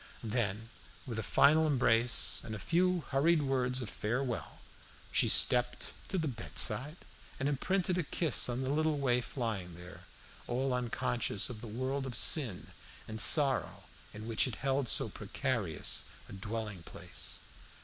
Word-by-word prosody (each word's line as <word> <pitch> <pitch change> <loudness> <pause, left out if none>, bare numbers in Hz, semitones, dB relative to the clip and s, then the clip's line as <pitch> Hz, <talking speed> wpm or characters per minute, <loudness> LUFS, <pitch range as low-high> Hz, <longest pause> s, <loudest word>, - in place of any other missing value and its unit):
Then, 110 -1 -1 0.4
with 115 -3 -4
a - - 0
final 155 +8 +4
embrace, 120 -4 +2
and 110 - -5
a - - -5
few 180 - +1
hurried 150 +3 +3
words 130 -2 0
of 110 - -6
farewell, 120 +2 -3 0.5
she - - +4
stepped 125 0 +2 0.2
to 190 - -1
the 160 -3 0
bedside 135 +3 -1 0.4
and 135 - 0
imprinted 180 +6 0
a - - 0
kiss 155 -3 +1
on 125 +2 -2
the 130 - -1
little 155 0 +1
waif 125 -2 -1
lying 100 -8 -3
there, 90 +1 -12 0.4
all 130 +2 0
unconscious 125 -3 -1
of 110 -3 -8
the 120 - -7
world 130 +5 -3
of 125 - -4
sin 115 - +2 0.4
and 110 -1 -2
sorrow 140 -4 +4 0.3
in 110 +1 -8
which 115 +3 +2
it 120 - -4
held 135 -2 +1
so - - +3
precarious 115 - -1 0.2
a - - -11
dwelling 105 -1 -5
place. - - -6
125 Hz, 150 wpm, -32 LUFS, 110-140 Hz, 0.5 s, final